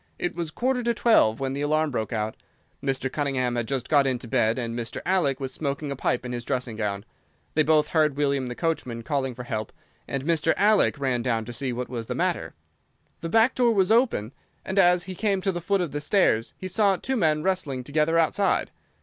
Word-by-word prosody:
It 175 Hz, -, -2 dB
was 170 Hz, -2 st, -4 dB
quarter 250 Hz, +9 st, -1 dB
to 235 Hz, 0 st, 0 dB
twelve 115 Hz, -, +4 dB
when 135 Hz, -1 st, -2 dB
the 140 Hz, -, -3 dB
alarm 155 Hz, +1 st, +1 dB
broke 110 Hz, -3 st, -3 dB
out. 110 Hz, -1 st, -2 dB, 0.5 s
Mr. 135 Hz, -1 st, 0 dB
Cunningham 135 Hz, -4 st, -1 dB
had 120 Hz, -1 st, -2 dB
just 135 Hz, -2 st, -2 dB
got 140 Hz, -2 st, +4 dB
into 125 Hz, -2 st, -2 dB
bed, 110 Hz, +1 st, +1 dB
and 115 Hz, -2 st, -3 dB
Mr. 120 Hz, -1 st, -5 dB
Alec 175 Hz, -8 st, +1 dB
was 135 Hz, -1 st, -4 dB
smoking 140 Hz, 0 st, -3 dB
a -, -, -2 dB
pipe 125 Hz, -1 st, -1 dB
in 125 Hz, -, -4 dB
his 120 Hz, -1 st, -4 dB
dressing 125 Hz, -2 st, -3 dB
gown. 100 Hz, -1 st, -3 dB, 0.5 s
They 155 Hz, -, +3 dB
both 155 Hz, 0 st, +3 dB
heard 155 Hz, -4 st, +2 dB
William 140 Hz, -3 st, 0 dB
the 125 Hz, -, -5 dB
coachman 125 Hz, -8 st, -2 dB
calling 135 Hz, -3 st, -2 dB
for 125 Hz, -, -7 dB
help, 110 Hz, -3 st, -4 dB, 0.4 s
and 135 Hz, -1 st, -3 dB
Mr. 165 Hz, -1 st, +2 dB
Alec 205 Hz, -5 st, +3 dB
ran 130 Hz, -3 st, 0 dB
down 115 Hz, -2 st, -1 dB
to 120 Hz, -, -7 dB
see 130 Hz, +1 st, -2 dB
what 125 Hz, +1 st, -4 dB
was 115 Hz, -2 st, -5 dB
the -, -, -3 dB
matter. -, -, -1 dB, 0.6 s
The 165 Hz, -, -5 dB
back 225 Hz, +6 st, +4 dB
door 240 Hz, -3 st, +2 dB
was 190 Hz, 0 st, +3 dB
open, 225 Hz, -, +2 dB, 0.3 s
and 190 Hz, +1 st, 0 dB
as 180 Hz, -1 st, +5 dB
he 190 Hz, -, -6 dB
came 200 Hz, 0 st, 0 dB
to 195 Hz, -, +1 dB
the 175 Hz, -1 st, -4 dB
foot 195 Hz, +2 st, +1 dB
of 170 Hz, -5 st, -2 dB
the 145 Hz, +1 st, -3 dB
stairs 145 Hz, -, +2 dB
he 185 Hz, -, -6 dB
saw 200 Hz, 0 st, +2 dB
two 265 Hz, +8 st, -2 dB
men 155 Hz, -8 st, +1 dB
wrestling 170 Hz, -9 st, -1 dB
together 155 Hz, +4 st, +1 dB
outside. 165 Hz, +5 st, +1 dB
145 Hz, 220 wpm, -25 LUFS, 125-180 Hz, 0.6 s, as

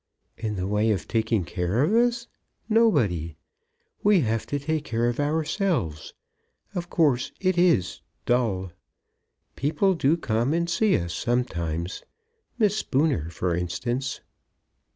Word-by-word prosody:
"In 110 Hz, -2 st, -3 dB
the 90 Hz, -1 st, -2 dB
way 105 Hz, +3 st, +1 dB
of 100 Hz, -5 st, -1 dB
taking 110 Hz, -4 st, 0 dB
care 90 Hz, +9 st, 0 dB
of 170 Hz, +8 st, +1 dB
us? 240 Hz, 0 st, +2 dB, 0.4 s
Nobody! 105 Hz, -, +2 dB, 0.7 s
We 205 Hz, -3 st, +4 dB
have 115 Hz, -3 st, -1 dB
to 145 Hz, -, -1 dB
take 150 Hz, +2 st, -2 dB
care 115 Hz, -2 st, 0 dB
of 120 Hz, +2 st, -2 dB
ourselves. 150 Hz, -, -1 dB, 0.6 s
Of 175 Hz, -2 st, -4 dB
course 140 Hz, -7 st, +2 dB
it 185 Hz, -1 st, +1 dB
is 175 Hz, -, +2 dB, 0.2 s
dull. 105 Hz, -7 st, 0 dB, 0.8 s
People 175 Hz, +7 st, +1 dB
do 160 Hz, -1 st, +2 dB
come 120 Hz, -1 st, 0 dB
and 170 Hz, 0 st, 0 dB
see 200 Hz, +4 st, +2 dB
us 85 Hz, -1 st, -4 dB
sometimes. 85 Hz, -9 st, -2 dB, 0.6 s
Miss 210 Hz, -4 st, +3 dB
Spooner, 135 Hz, -, 0 dB
for 85 Hz, 0 st, -1 dB
instance." 120 Hz, +10 st, -3 dB
125 Hz, 130 wpm, -25 LUFS, -, 0.8 s, We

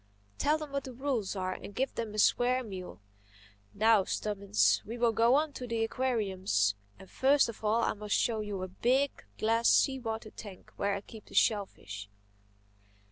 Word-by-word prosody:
Tell 300 Hz, +2 st, +3 dB
them 305 Hz, -2 st, -7 dB
what 280 Hz, -1 st, -3 dB
the 260 Hz, -, -7 dB
rules 250 Hz, -7 st, -2 dB
are 185 Hz, -1 st, -2 dB
and 205 Hz, -, -9 dB
give 265 Hz, +1 st, -1 dB
them 220 Hz, -2 st, -4 dB
a -, -, -5 dB
square 250 Hz, +4 st, +3 dB
meal—Now, 105 Hz, -, -2 dB
Stubbins, 205 Hz, -1 st, +1 dB
we 230 Hz, +3 st, -6 dB
will 235 Hz, -1 st, +3 dB
go 230 Hz, +3 st, +4 dB
on 300 Hz, 0 st, +1 dB
to 250 Hz, -1 st, -6 dB
the 230 Hz, -1 st, -1 dB
aquariums. 195 Hz, -, 0 dB, 0.2 s
And 190 Hz, -, -13 dB
first 275 Hz, +6 st, +3 dB
of 230 Hz, -1 st, -9 dB
all 220 Hz, +2 st, +2 dB
I -, -, +1 dB
must 210 Hz, 0 st, -2 dB
show 225 Hz, -2 st, +1 dB
you 210 Hz, -2 st, -4 dB
my 185 Hz, -, -3 dB
big, 250 Hz, +9 st, +1 dB, 0.3 s
glass, 230 Hz, +2 st, +2 dB
sea 265 Hz, -2 st, +4 dB
water 220 Hz, -2 st, -5 dB
tank 200 Hz, -4 st, -11 dB
where 200 Hz, 0 st, 0 dB
I 200 Hz, -, -4 dB
keep 215 Hz, +1 st, -13 dB
the -, -, -13 dB
shellfish." 105 Hz, -, 0 dB
215 Hz, 180 wpm, -31 LUFS, 190-245 Hz, 0.3 s, go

